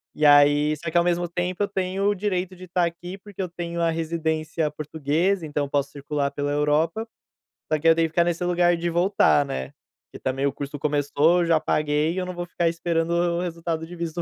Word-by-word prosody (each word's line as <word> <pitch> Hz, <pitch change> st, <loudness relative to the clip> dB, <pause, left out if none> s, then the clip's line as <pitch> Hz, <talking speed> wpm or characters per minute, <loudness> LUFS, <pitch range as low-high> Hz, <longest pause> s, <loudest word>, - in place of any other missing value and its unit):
E 150 Hz, -, +1 dB
aí 145 Hz, +1 st, +6 dB
só 170 Hz, +3 st, -5 dB
que 175 Hz, -, +1 dB
ao 170 Hz, -, +5 dB
mesmo 175 Hz, 0 st, 0 dB
tempo 180 Hz, +3 st, -2 dB
eu -, -, 0 dB
tenho 190 Hz, 0 st, -2 dB
o 205 Hz, -, +1 dB
direito 185 Hz, -2 st, -2 dB
de 185 Hz, +1 st, -11 dB
estar 180 Hz, 0 st, +1 dB
aqui 175 Hz, +2 st, -6 dB
porque 200 Hz, 0 st, -9 dB
eu 185 Hz, -, -2 dB
tenho 170 Hz, 0 st, -4 dB
a 165 Hz, -, +2 dB
residência 160 Hz, -1 st, -1 dB
portuguesa, 160 Hz, +5 st, -1 dB
então 145 Hz, -1 st, -2 dB
eu -, -, -10 dB
posso 140 Hz, 0 st, -1 dB
circular 145 Hz, 0 st, -2 dB
pela 145 Hz, 0 st, -2 dB
Europa, 155 Hz, +9 st, +1 dB, 0.6 s
só 155 Hz, -, +2 dB
que 165 Hz, -, +1 dB
eu 165 Hz, -, +7 dB
tenho 165 Hz, 0 st, +2 dB
que -, -, -15 dB
ficar 170 Hz, +2 st, +3 dB
nesse 175 Hz, +1 st, -1 dB
lugar 175 Hz, 0 st, +3 dB
de 170 Hz, +1 st, -2 dB
voltar, 175 Hz, -3 st, +3 dB
né. 140 Hz, 0 st, -5 dB, 0.4 s
Porque -, -, -10 dB
também 135 Hz, +1 st, -1 dB
o 140 Hz, -, +2 dB
curso 145 Hz, +1 st, -6 dB
começou, 145 Hz, +3 st, +2 dB
eu -, -, +1 dB
já 165 Hz, -1 st, +3 dB
paguei 150 Hz, +2 st, +1 dB
e -, -, -7 dB
eu 185 Hz, -, -1 dB
não 185 Hz, -, -5 dB
vou 175 Hz, 0 st, -5 dB
ficar 175 Hz, -1 st, -1 dB
esperando 165 Hz, 0 st, -1 dB
o 170 Hz, 0 st, +1 dB
resultado 165 Hz, -2 st, -3 dB
de 175 Hz, -, -9 dB
visto 170 Hz, 0 st, -4 dB
165 Hz, 230 wpm, -24 LUFS, 150-175 Hz, 0.6 s, eu